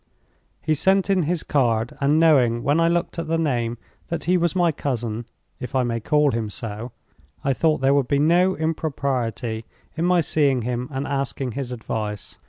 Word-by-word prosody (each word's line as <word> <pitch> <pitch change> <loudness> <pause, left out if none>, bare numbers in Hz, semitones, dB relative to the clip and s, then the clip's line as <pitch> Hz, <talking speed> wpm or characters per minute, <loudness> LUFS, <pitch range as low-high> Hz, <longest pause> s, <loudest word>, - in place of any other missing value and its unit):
He 155 - +2
sent 190 +5 +2
in 190 -2 +3
his 175 -3 -1
card, 120 -5 +1
and 145 +3 +3
knowing, 125 -8 +4
when 145 +4 +2
I 165 - +4
looked 170 0 -1
at 165 - -4
the 165 +1 +1
name, 120 -7 -1 0.3
that 170 - -3
he 180 - +2
was 175 0 +1
my 175 -2 +3
cousin—if 120 -2 -5
I 130 - +3
may 115 -1 -1
call 150 +4 +2
him 115 -2 -2
so—I 105 - -6
thought 155 +1 +1
there 135 +1 +4
would 140 -3 +2
be 140 - +2
no 175 +6 +3
impropriety 130 - -2 0.3
in 165 +2 -1
my 180 -1 +4
seeing 140 -6 +1
him 125 +1 -2
and 135 -1 -3
asking 135 -2 -2
his 130 +1 -5
advice. 110 -3 -5
140 Hz, 180 wpm, -23 LUFS, 120-160 Hz, 0.3 s, knowing